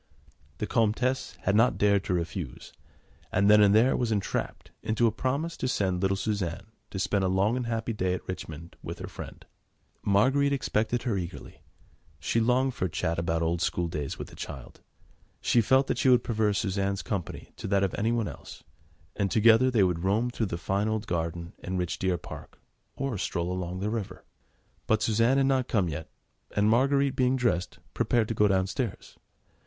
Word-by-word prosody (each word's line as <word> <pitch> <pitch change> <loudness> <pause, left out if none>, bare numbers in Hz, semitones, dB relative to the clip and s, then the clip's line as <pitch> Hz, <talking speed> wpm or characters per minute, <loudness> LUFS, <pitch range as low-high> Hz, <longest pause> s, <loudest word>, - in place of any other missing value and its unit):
The - - -2
Comtesse 120 +4 0
had 100 - +2
not 115 +3 +4
dared 100 -1 +3
to 90 - 0
refuse, 85 -2 -5 0.6
and 100 +2 +4
then 105 0 +7
and 100 0 +5
there 120 +4 +5
was 120 -2 0
entrapped 100 -3 -2
into 110 +2 +1
a 115 - +4
promise 140 +9 -2
to 130 - -2
send 95 -7 0
little 95 0 +1
Suzanne 100 -1 -3 0.2
to - - -6
spend 100 +1 0
a - - +2
long 95 +5 +2
and 125 -2 -2
happy 115 0 -2
day 90 -3 0
at - - -9
Richmond 85 -2 -7
with - - -6
her - - -6
friend. - - -9 0.6
Marguerite 135 +8 +3
expected 120 -2 0
her 115 -6 0
eagerly; 85 -1 -8 0.6
she 95 +9 0
longed 125 +3 +2
for 95 - -2
a - - -1
chat 80 +1 -1
about 85 -1 0
old 85 +1 0
schooldays 85 -6 -2
with - - -7
the - - -13
child; 65 -4 -8 0.6
she 120 - +3
felt 130 +4 +4
that - - -2
she 130 - +3
would 125 -1 +5
prefer 110 -2 +1
Suzanne's 100 -1 -1
company 95 -7 -5
to - - -5
that 100 0 +2
of 95 - 0
anyone 115 0 0
else, - - -10 0.5
and 100 -1 0
together 115 +4 +5
they 115 -6 +3
would 90 -2 0
roam 110 +6 +1
through 115 -3 -1
the 85 - -3
fine 100 +5 -1
old 110 0 -1
garden 85 -1 -3
and 95 +1 -4
rich 90 -1 -2
deer 95 -2 +1
park, - - -11 0.4
or 135 -7 -3
stroll 85 0 -2
along 90 0 -4
the 105 +2 -1
river. 110 -4 -5 0.6
But 110 0 +2
Suzanne 115 +4 +3
had 135 - +3
not 130 -2 +2
come 100 -7 +1
yet, 75 +1 -6 0.5
and 105 0 +3
Marguerite 140 +3 +3
being 130 0 +2
dressed, 120 -8 0 0.2
prepared 115 -3 +1
to - - 0
go 105 -1 +3
downstairs. 100 +4 -2
105 Hz, 190 wpm, -28 LUFS, 95-120 Hz, 0.6 s, then